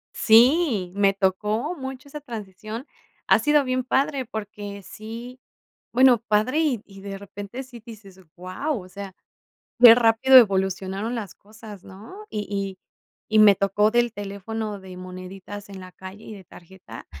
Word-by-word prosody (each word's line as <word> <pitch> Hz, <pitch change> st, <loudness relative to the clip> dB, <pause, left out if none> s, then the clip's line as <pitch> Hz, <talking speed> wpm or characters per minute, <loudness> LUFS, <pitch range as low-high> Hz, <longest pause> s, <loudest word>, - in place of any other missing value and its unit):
Sí, 235 Hz, -, +4 dB
me 200 Hz, -1 st, +3 dB
tocó 210 Hz, -, -1 dB
mucho 265 Hz, -2 st, -8 dB
esa 295 Hz, +1 st, -9 dB
transición. 220 Hz, -1 st, -8 dB, 0.4 s
Ha -, -, +5 dB
sido 295 Hz, -1 st, +3 dB
bien 255 Hz, -1 st, -1 dB
padre 270 Hz, +1 st, 0 dB
porque 205 Hz, -3 st, -7 dB
sí 230 Hz, +6 st, -9 dB, 0.5 s
bueno, 250 Hz, -1 st, +5 dB
padre 215 Hz, +8 st, +1 dB
y 265 Hz, -9 st, 0 dB
y 195 Hz, -1 st, -14 dB
de 195 Hz, 0 st, -7 dB
repente 200 Hz, +5 st, -8 dB
sí 245 Hz, -3 st, -13 dB
dices: 200 Hz, -5 st, -13 dB, 0.2 s
"¡Guau!" 185 Hz, -, -4 dB
O 185 Hz, -, -15 dB
sea, 195 Hz, 0 st, -9 dB, 0.7 s
qué 235 Hz, -2 st, +11 dB
rápido 240 Hz, +3 st, +5 dB
evolucionaron 195 Hz, 0 st, 0 dB
las 210 Hz, -6 st, -6 dB
cosas, 210 Hz, -2 st, -13 dB
¿no? 225 Hz, -, -12 dB
Y 210 Hz, -1 st, -4 dB
y 195 Hz, -2 st, -4 dB, 0.5 s
y 215 Hz, -, +2 dB
me 205 Hz, -2 st, +7 dB
tocó 200 Hz, +2 st, +2 dB
del 240 Hz, 0 st, +1 dB
teléfono 205 Hz, +1 st, -6 dB
de 185 Hz, -1 st, -11 dB
moneditas 185 Hz, +2 st, -9 dB
en 195 Hz, -1 st, -9 dB
la 185 Hz, 0 st, -11 dB
calle 190 Hz, +3 st, -11 dB
y 215 Hz, -, -9 dB
de 195 Hz, -, -13 dB
tarjeta 170 Hz, -9 st, -13 dB
210 Hz, 155 wpm, -23 LUFS, 195-240 Hz, 0.7 s, qué